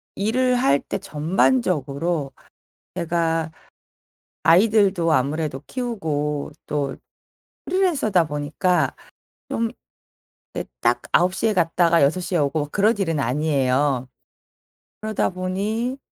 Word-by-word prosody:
일을 250 +5 +1
할 140 - +3
때 - - -4
전반적으로 165 - 0 0.6
제가 165 -2 0 0.9
아이들도 190 -2 +4
아무래도 145 0 0
키우고 155 - -3
또 140 -2 -2 0.7
프리랜서다 290 - +2
보니까 150 +5 0 0.6
좀 230 0 -1 0.8
네, - - -3 0.2
딱 - - +2
9 180 +1 +3
시에 220 +1 +1
갔다가 170 -1 +3
6 160 +7 +2
시에 175 0 -1
오고 145 +1 0
그런 215 +2 +2
일은 165 -6 0
아니에요. 135 -1 +1 0.9
그러다 215 -1 0
보니 205 +7 -2
170 Hz, 210 characters per minute, -22 LUFS, 150-205 Hz, 0.9 s, 아이들도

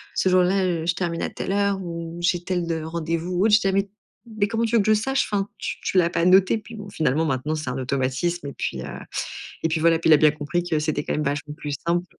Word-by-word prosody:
ce 190 - +2
jour 185 0 +5
là, 190 +2 +2
heu, 170 -3 -1
je 170 0 +1
termine 170 -2 -2
à - - -1
telle - - -5
heure, 200 0 +1
ou, 170 -1 -6
j'ai 175 0 +1
tel 175 -1 -1 0.2
rendez-vous 165 +2 -3
ou 180 +2 +1
autre». 220 - +3
Je - - +5
dis: 195 - -1
«Ah - - +3
mais 195 0 +1 0.5
mais 205 -1 +2
comment 225 +3 -2
veux 230 - +2
tu 235 - +2
que 200 - +1
je 215 - +4
le - - +6
sache? 270 +6 0
Enfin 200 -1 0
tu - - -4
tu - - -1
l'as 170 -2 +4
pas 170 -1 0
noté». 190 +3 +5
Puis 220 +2 -12
bon, 210 - -7
bah, - - -10
finalement, 155 0 +1
maintenant 145 +2 -1
c'est 150 -4 -4
un 125 - -3
automatisme 135 +6 -1
et 140 - -6
puis, - - -4
heu - - -6 0.8
et 165 - +2
puis 160 0 -1
voilà, 165 0 +4
puis 165 - 0
il - - +8
a - - +8
bien 155 +1 +5
compris 150 +4 -2
que 165 -3 -1
c'était 150 -1 -1
quand - - -2
même 150 - 0
vachement 145 +1 -3
plus 145 -1 -5
simple. 175 +1 +1
170 Hz, 290 wpm, -23 LUFS, 155-195 Hz, 0.8 s, il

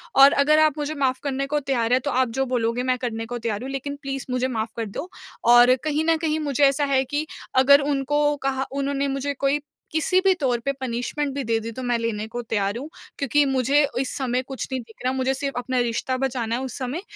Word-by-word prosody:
और 275 +1 +8
अगर 305 +2 +4
आप 310 -1 +3
मुझे 295 0 -2
माफ़ 265 -3 0
करने 275 -1 -1
को 295 - +3
तैयार 255 -5 -1
हैं 255 - +5
तो - - 0
आप 255 -1 +2
जो 270 - +2
बोलोगे 245 -1 0
मैं 255 0 +1
करने 225 -2 -3
को 245 +2 -5
तैयार 225 -3 -3
हूँ, 265 - -5
लेकिन 275 +1 -4
प्लीज 270 -1 -4
मुझे 255 0 0
माफ़ 225 -3 -2
कर 230 - -1
दो। 280 - -6 0.4
और 245 +1 +7
कहीं 310 0 0
न 325 - +4
कहीं 315 -1 -1
मुझे 290 -2 0
ऐसा 280 +1 +3
है 270 -1 +2
कि 290 +3 -2 0.4
अगर 280 +2 +7
उनको 290 +1 +1
कहा 270 0 0
उन्होंने 280 0 -1
मुझे 275 +1 -2
कोई 275 +1 0 0.3
किसी 320 +4 +2
भी 385 0 +4
तौर 250 -5 +1
पे 275 +4 -1
पनिशमेंट 260 +3 -2
भी 280 - -2
दे 225 -1 0
दी 225 +1 -6
तो 255 +3 -7
मैं 245 -1 +1
लेने 220 -2 -2
को 240 +2 -5
तैयार 205 -2 -1
हूँ 280 +5 -7 0.3
क्योंकि 285 +1 +2
मुझे 270 +2 +3
इस 265 - -1
समय 255 -2 0
कुछ 265 0 -6
नहीं 260 -1 -2
दिख 225 -1 -17
रहा, 255 +1 +1
मुझे 265 0 0
सिर्फ़ 275 0 -3
अपना 255 +1 -1
रिश्ता 240 +2 -1
बचाना 250 -3 -1
है 250 - -3
उस 260 -4 -5
समय 265 +6 -3
265 Hz, 240 wpm, -23 LUFS, 245-280 Hz, 0.4 s, और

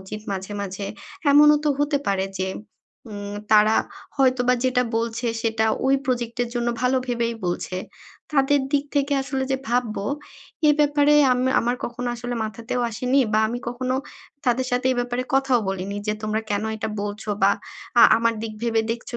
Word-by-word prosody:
উচিত 190 +3 -7
মাঝে, 190 +1 -5
মাঝে। 195 0 -4 0.4
এমনও 295 +1 +7
তো - - +3
হতে 290 0 +1
পারে 195 -1 +1
যে, 190 - 0 0.6
উম 205 0 -6 0.2
তারা 215 +1 +6 0.4
হয়তোবা 255 -2 +3
যেটা 255 -1 +3
বলছে 230 +1 -2 0.2
সেটা 225 -1 +1 0.2
ওই 270 - +4
প্রজেক্টের 245 -2 -1
জন্য 240 0 0
ভালো 250 +1 +2
ভেবেই 235 -1 -1
বলছে। 180 +1 -2 0.6
তাদের 280 0 +3
দিক 285 -1 +2
থেকে 285 0 +1
আসলে 265 0 -2
যে 265 - +2
ভাববো, 235 -4 -1 0.6
এ - - +8
ব্যাপারে 290 0 +4 0.2
আম 250 - 0 0.2
আমার 240 +2 0
কখনো 245 +1 -4
আসলে 245 +1 -4
মাথাতেও 225 +3 -4
আসেনি 250 +5 +1
বা 215 - +4
আমি 240 +2 -3
কখনো 255 +1 -2 0.5
তাদের 250 +1 +2
সাথে 250 +1 +1
এ - - -2
ব্যাপারে 245 +1 -2
কথাও 270 -2 +3
বলিনি 195 +1 -3
যে 210 - +1
তোমরা 215 0 -1
কেনো 205 +2 0
এটা 220 0 -3
বলছো? 205 +1 -6
বা 195 - +6 0.5
আ - - +9
আমার 230 0 +1
দিক 225 - -4
ভেবে 225 -1 +2
দেখছো 235 +1 -4
240 Hz, 170 wpm, -23 LUFS, 215-255 Hz, 0.6 s, আ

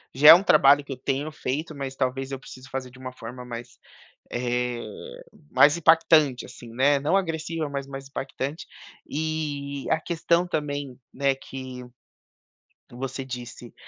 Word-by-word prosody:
já 150 +3 +8
é 180 +4 +10
trabalho 145 -4 +6
que 140 - -6
eu - - -9
tenho 140 +3 -2
feito, 150 +3 -4
mas 135 -1 -4
talvez 135 +1 -2
eu 135 - -4
precise 130 0 -12
fazer 130 -1 -4
de 130 +1 -16
uma 130 -1 -6
forma 125 +1 -9
mais, 120 0 -8 0.5
eh, 125 0 -1 0.7
mais 150 +3 +6
impactante 160 -5 +4
assim, 115 -2 -12
né. 140 +3 +3
Não 150 +6 +1
agressiva 165 -3 -2
mas 140 -1 -4
mais 135 0 -8
impactante 135 +2 -5 0.4
e 145 -3 -3
a 160 - +3
questão 170 +1 +1
também, 145 -5 -3
né, 140 0 +2
que 130 -2 -8 1.1
você 135 +2 -5
disse 120 -2 -8
135 Hz, 145 wpm, -25 LUFS, 130-150 Hz, 1.1 s, é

